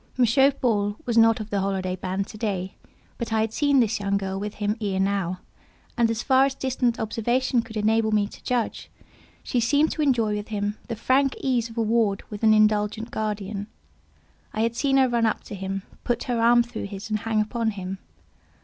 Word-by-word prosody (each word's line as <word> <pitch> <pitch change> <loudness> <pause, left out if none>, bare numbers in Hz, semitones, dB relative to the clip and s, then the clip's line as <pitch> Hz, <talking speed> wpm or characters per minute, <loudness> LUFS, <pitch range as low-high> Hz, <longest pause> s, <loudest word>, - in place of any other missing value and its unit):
M. 250 - +5 0.3
Paul 205 -5 +1
was 235 - -1
not 225 0 +5
of 215 0 -7
the 200 - +1
holiday 190 -1 -1
band 185 +2 -3
to 215 - -9
day, 190 -4 -2 0.5
but 235 - -4
I 220 0 +2
had 220 0 -1
seen 285 0 +3
this 230 -2 +1
young 200 0 0
girl 195 -1 -3
with 210 +1 -5
him 205 0 -1
ere 195 -3 -1
now, 190 -2 -1 0.5
and 235 -2 +3
as 230 +1 -2
far 265 0 +5
as 275 -1 -2
distant 255 -3 -1
observation 240 +3 0
could 225 -1 -8
enable 220 +1 +2
me 210 -1 +3
to - - -12
judge, 245 -3 -2 0.5
she 250 - 0
seemed 285 +7 +3
to 310 - -3
enjoy 225 -7 +1
him 205 -1 -3
with - - -27
the 230 - -3
frank 265 +4 +2
ease 245 -4 0
of 225 - -13
a 230 - +2
ward 220 -3 +1
with 210 - -6
an 220 -1 +5
indulgent 215 +1 +2
guardian. 205 -1 -3 0.9
I 215 - -1
had 230 +1 0
seen 270 +1 +2
her 265 -1 +5
run 235 -2 +2
up 220 - -2
to - - -9
him, 195 0 -4 0.2
put 240 -1 -1
her 240 -2 -1
arm 240 +1 +5
through 235 - -6
his, 200 +2 -7
and 215 - +1
hang 220 0 0
upon 225 +1 0
him. 190 -2 -5
220 Hz, 210 wpm, -25 LUFS, 205-235 Hz, 0.9 s, M